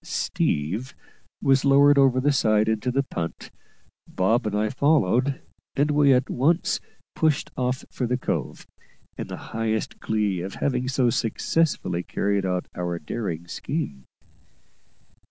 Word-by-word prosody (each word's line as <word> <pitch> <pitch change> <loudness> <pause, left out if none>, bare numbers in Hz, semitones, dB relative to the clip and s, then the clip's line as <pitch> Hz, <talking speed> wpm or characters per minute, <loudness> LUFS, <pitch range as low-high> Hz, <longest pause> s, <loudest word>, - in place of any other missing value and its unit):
"Steve" 100 - -1 0.5
was 135 -1 +4
lowered 140 +1 +6
over 135 -2 +4
the 145 +3 +2
side 110 -5 +2
into 110 +3 0
the 135 +2 +1
punt, 85 -10 -5 0.6
Bob 110 +5 +1
and 105 - -2
I 105 +1 +1
followed, 140 -1 +2 0.4
and 145 +2 +2
we 145 -1 +4
at 130 0 +3
once 160 +7 +1 0.3
pushed 155 -2 +1
off 125 0 -2
for 125 - -2
the 125 +1 0
cove, - - -3 0.5
in - - -5
the - - -6 0.2
highest 110 -1 -2
glee 105 -5 0
at 95 +2 -6
having 130 -2 -1
so 130 -2 +2
successfully 115 - 0
carried 100 +1 -1
out 90 -1 -2
our 90 -1 -3
daring 85 0 -4
scheme. 110 - -4
125 Hz, 135 wpm, -24 LUFS, 100-140 Hz, 0.6 s, lowered